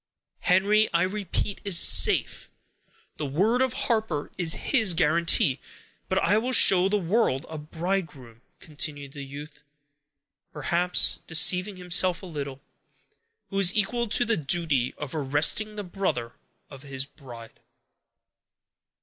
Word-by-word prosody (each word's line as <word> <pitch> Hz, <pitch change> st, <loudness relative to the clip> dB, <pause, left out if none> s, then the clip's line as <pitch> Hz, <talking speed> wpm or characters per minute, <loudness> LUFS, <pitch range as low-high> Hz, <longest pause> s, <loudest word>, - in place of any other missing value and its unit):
"Henry, 205 Hz, +4 st, +2 dB
I 170 Hz, -, +2 dB
repeat, 200 Hz, +1 st, -4 dB
is 195 Hz, -4 st, +3 dB
safe. -, -, +4 dB, 0.7 s
The 150 Hz, -, -4 dB
word 205 Hz, -, 0 dB
of 260 Hz, -2 st, 0 dB
Harper 220 Hz, -, -2 dB
is 165 Hz, -2 st, +1 dB, 0.2 s
his 220 Hz, -, +2 dB
guarantee; 165 Hz, -3 st, +1 dB, 0.5 s
but 190 Hz, -, -1 dB
I 205 Hz, +2 st, +2 dB
will 250 Hz, +3 st, -3 dB
show 190 Hz, -4 st, +5 dB
the 210 Hz, -, 0 dB
world 180 Hz, -, -1 dB
a 160 Hz, -1 st, -7 dB
bridegroom," 155 Hz, -7 st, -5 dB, 0.2 s
continued 145 Hz, -2 st, -6 dB
the 140 Hz, 0 st, -9 dB
youth, 145 Hz, +3 st, -11 dB, 0.9 s
perhaps 170 Hz, +4 st, +1 dB
deceiving 180 Hz, +4 st, +3 dB
himself 180 Hz, 0 st, +1 dB
a -, -, -7 dB
little, 140 Hz, -5 st, -7 dB, 0.9 s
"who 195 Hz, -, -2 dB
is 185 Hz, -1 st, +3 dB
equal 235 Hz, +3 st, 0 dB
to 240 Hz, +3 st, 0 dB
the 230 Hz, -2 st, 0 dB
duty 145 Hz, -4 st, -1 dB
of 150 Hz, -3 st, -7 dB
arresting 150 Hz, +9 st, 0 dB
the 205 Hz, -, -6 dB
brother 175 Hz, -, -4 dB, 0.4 s
of 135 Hz, -2 st, -14 dB
his 135 Hz, -1 st, -6 dB
bride." 120 Hz, -5 st, -14 dB
170 Hz, 130 wpm, -25 LUFS, 145-200 Hz, 0.9 s, show